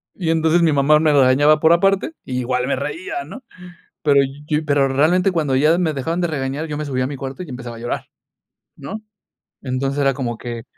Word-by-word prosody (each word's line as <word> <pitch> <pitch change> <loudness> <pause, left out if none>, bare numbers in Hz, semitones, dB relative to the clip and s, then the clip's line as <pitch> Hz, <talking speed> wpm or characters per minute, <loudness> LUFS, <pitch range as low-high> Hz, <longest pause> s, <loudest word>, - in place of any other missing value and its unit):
Y 170 -4 -1
entonces 160 +1 +2
mi 160 -2 +3
mamá 145 +2 +4
me 155 -1 +3
regañaba 145 +3 +4
por 160 - +5
aparte, 195 - +2
y 125 -2 -3
igual 125 0 -1
me 140 - 0
reía, 355 - -5
¿no?, 265 - -11 0.6
pero 140 -2 +4 0.3
yo, 155 0 -1
pero 145 -2 +2
realmente 170 +8 +2
cuando 150 -6 0
ya 155 +5 +4
me 170 -3 0
dejaban 165 +6 -2
de 175 - 0
regañar 140 0 -3
yo 150 -2 -5
me 150 - -3
subía 130 -2 -1
a - - -1
mi 145 - -6
cuarto 135 +6 -6
y 180 - -10
empezaba 125 -2 -7
a - - -11
llorar, 120 - -4 0.7
¿no?, 215 +10 -7 0.6
entonces, 135 +1 -2
era 135 -1 +3
como 120 -3 -3
que 120 -2 -6
145 Hz, 210 wpm, -20 LUFS, 130-165 Hz, 0.7 s, por